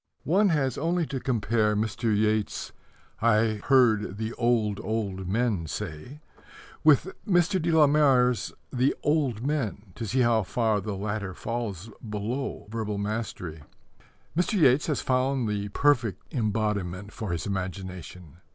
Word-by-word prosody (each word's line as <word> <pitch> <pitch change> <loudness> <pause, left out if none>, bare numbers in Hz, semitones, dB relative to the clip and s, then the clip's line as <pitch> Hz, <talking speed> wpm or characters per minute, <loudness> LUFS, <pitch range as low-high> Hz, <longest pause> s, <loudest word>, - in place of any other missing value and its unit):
One 195 +6 +4
has 135 -6 0
only 170 +2 +1
to 140 -3 -4
compare 110 -3 +1
Mr. 110 +3 -2
Yeats's 110 0 0 0.5
I 110 -2 +3
Heard 110 -7 +3
the 110 +1 -3
Old, 115 -4 +1
Old 100 -4 -3
Men 105 -4 0
Say 105 - -6 0.6
with 155 +4 +5 0.2
Mr. 180 0 +3
de 165 - 0
la 160 -2 +6
Mare's 135 -5 +3 0.2
The 130 +2 +2
Old 140 -7 +1
Men 110 -9 -2
to 115 - -5
see 130 +5 +1
how 120 -2 +3
far 110 +1 0
the 105 -1 -4
latter 100 -1 -3
falls 115 -3 -4
below 110 +5 -4
verbal 110 -2 -3
mastery. 100 -6 -4 0.7
Mr. 180 +6 +1
Yeats 150 -8 +4
has 150 -4 0
found 130 -1 +1
the 105 -1 -2
perfect 115 -5 +1
embodiment 105 -4 -1
for 105 -5 -4
his 85 -3 -2
imagination. 90 -3 -6
110 Hz, 135 wpm, -27 LUFS, 100-130 Hz, 0.7 s, la